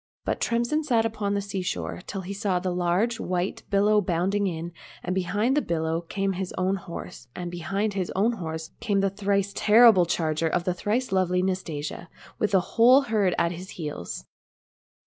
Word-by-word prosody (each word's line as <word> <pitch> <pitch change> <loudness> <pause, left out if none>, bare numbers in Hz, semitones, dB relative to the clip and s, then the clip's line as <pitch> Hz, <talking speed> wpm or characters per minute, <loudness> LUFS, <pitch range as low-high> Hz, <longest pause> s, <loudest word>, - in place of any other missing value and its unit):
But - - -1
Tremsin 240 +7 +1
sat 235 -6 +2
upon 210 -2 -1
the 200 - 0
sea 195 -1 -4
shore 180 - -3
till 195 - -4
he 190 +2 -6
saw 200 -2 0
the 180 0 -2
large 180 +7 +1
white 180 +1 -2
billow 210 +1 +4
bounding 190 +3 0
in, 170 -1 -4 0.3
and 180 - -2
behind 205 +7 +1
the 295 - +3
billow 160 - -1
came 195 +3 -2
his 185 0 -4
own 185 +1 +1
horse, 170 -9 -9
and 175 -1 -5
behind 195 +5 -2
his 190 -2 -2
own 210 +5 +3
horse 160 -6 -5
came 200 -3 +1
the 195 -1 +1
thrice 200 0 0
terrible 215 -5 +6
charger 160 -1 0
of 175 +2 0
the 180 - 0
thrice 215 +7 -1
lovely 180 -1 +2
Nastasia, 170 -4 -3 0.3
with 210 - +1
the 190 -3 +4
whole 245 +8 +5
herd 215 -8 +1
at 170 0 +2
his 180 +2 -8
heels. 150 - -5
190 Hz, 185 wpm, -26 LUFS, 175-210 Hz, 0.3 s, terrible